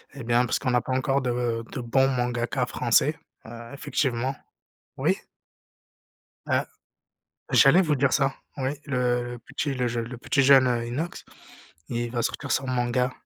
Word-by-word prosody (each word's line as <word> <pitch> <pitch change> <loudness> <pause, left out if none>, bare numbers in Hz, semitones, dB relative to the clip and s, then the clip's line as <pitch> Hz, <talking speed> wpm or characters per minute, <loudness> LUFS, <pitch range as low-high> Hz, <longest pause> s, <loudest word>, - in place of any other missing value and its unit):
Eh 140 - -7
bien 120 +1 +2
parce 120 - 0
qu'on 125 -3 -1
a 125 - +3
pas 130 - -3
encore 135 +1 +1
de 120 -2 -1
de 130 - -4
bons 130 +3 +3
mangakas 125 0 -1
français, 125 +4 +2 0.3
heu, 115 +1 -10
effectivement. 135 -2 -1 0.6
Oui? - - +1 1.3
Heu, - - +1 0.9
j'allais 150 +7 +6
vous 155 -5 +1
dire 140 -1 +2
ça. 135 -2 +2 0.2
Oui 130 -1 -1 0.2
le 125 -3 0
le 120 - -9
petit 135 +4 -3
le 125 -2 -1
jeu 120 0 -2
le 120 +2 -7
petit 140 +3 +1
jeune, 135 -1 +7
heu, 120 -1 0
Inox, 155 +9 -4 0.6
il 120 0 -2
va 120 -1 -1
sortir 140 +4 -3
son 135 - 0
manga. 125 0 0
125 Hz, 165 wpm, -26 LUFS, 120-135 Hz, 1.3 s, jeune